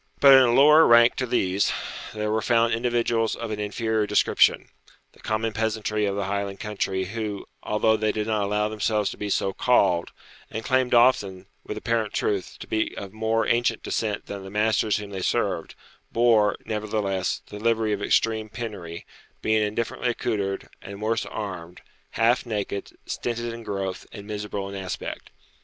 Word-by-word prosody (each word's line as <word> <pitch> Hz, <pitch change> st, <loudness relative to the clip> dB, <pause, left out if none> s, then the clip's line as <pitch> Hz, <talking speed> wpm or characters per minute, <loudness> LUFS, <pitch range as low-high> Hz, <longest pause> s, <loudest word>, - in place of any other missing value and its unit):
But, 140 Hz, -1 st, +8 dB
in 135 Hz, -, +10 dB
a 125 Hz, -2 st, +4 dB
lower 150 Hz, +5 st, +7 dB
rank 120 Hz, 0 st, +7 dB
to 130 Hz, -, -1 dB
these, 95 Hz, -5 st, +1 dB, 0.4 s
there 105 Hz, 0 st, -2 dB
were 110 Hz, 0 st, +1 dB
found 115 Hz, 0 st, +2 dB
individuals 115 Hz, -1 st, +1 dB
of 115 Hz, -1 st, -5 dB
an 105 Hz, -, -3 dB
inferior 110 Hz, +1 st, -1 dB
description, -, -, +3 dB, 0.4 s
the -, -, -23 dB
common 110 Hz, +1 st, -2 dB
peasantry 110 Hz, -1 st, -1 dB
of 100 Hz, -, -1 dB
the 100 Hz, -1 st, -2 dB
Highland 100 Hz, 0 st, -3 dB
country, 95 Hz, -3 st, -2 dB
who, 105 Hz, 0 st, -4 dB, 0.2 s
although 110 Hz, +1 st, +2 dB
they 110 Hz, 0 st, 0 dB
did 105 Hz, 0 st, -2 dB
not 110 Hz, -1 st, 0 dB
allow 105 Hz, +1 st, 0 dB
themselves 105 Hz, -1 st, 0 dB
to -, -, -9 dB
be 105 Hz, -, -4 dB
so 95 Hz, 0 st, 0 dB
called, 95 Hz, -9 st, +2 dB, 0.4 s
and 110 Hz, +1 st, -5 dB
claimed 130 Hz, -2 st, +2 dB
often, 100 Hz, -6 st, +3 dB, 0.2 s
with -, -, -6 dB
apparent 115 Hz, -2 st, -1 dB
truth, 100 Hz, -3 st, -2 dB
to -, -, -8 dB
be 110 Hz, 0 st, -1 dB
of 100 Hz, 0 st, -7 dB
more 110 Hz, +1 st, 0 dB
ancient 115 Hz, -1 st, +1 dB
descent 105 Hz, -2 st, -2 dB
than 100 Hz, -1 st, -7 dB
the 95 Hz, -, -8 dB
masters 105 Hz, +1 st, +1 dB
whom 105 Hz, -1 st, -7 dB
they 95 Hz, -1 st, -5 dB
served, -, -, -1 dB, 0.4 s
bore, 115 Hz, -3 st, +4 dB
nevertheless, 105 Hz, -3 st, -2 dB
the 105 Hz, -, -8 dB
livery 110 Hz, -1 st, +1 dB
of 100 Hz, -, -3 dB
extreme 110 Hz, +1 st, +1 dB
penury, 100 Hz, -8 st, -7 dB, 0.4 s
being 110 Hz, 0 st, +2 dB
indifferently 110 Hz, +3 st, -1 dB
accoutred, 100 Hz, -5 st, -2 dB
and 100 Hz, 0 st, -9 dB
worse 110 Hz, +1 st, -1 dB
armed, 90 Hz, -5 st, -6 dB, 0.3 s
half 115 Hz, +2 st, +3 dB
naked, 105 Hz, -3 st, -4 dB
stinted 120 Hz, -1 st, -3 dB
in 115 Hz, -, -8 dB
growth, 95 Hz, -4 st, -4 dB
and 100 Hz, -2 st, -9 dB
miserable 105 Hz, -2 st, -4 dB
in 100 Hz, -, -8 dB
aspect. 95 Hz, -2 st, -6 dB
110 Hz, 170 wpm, -25 LUFS, 100-115 Hz, 0.4 s, in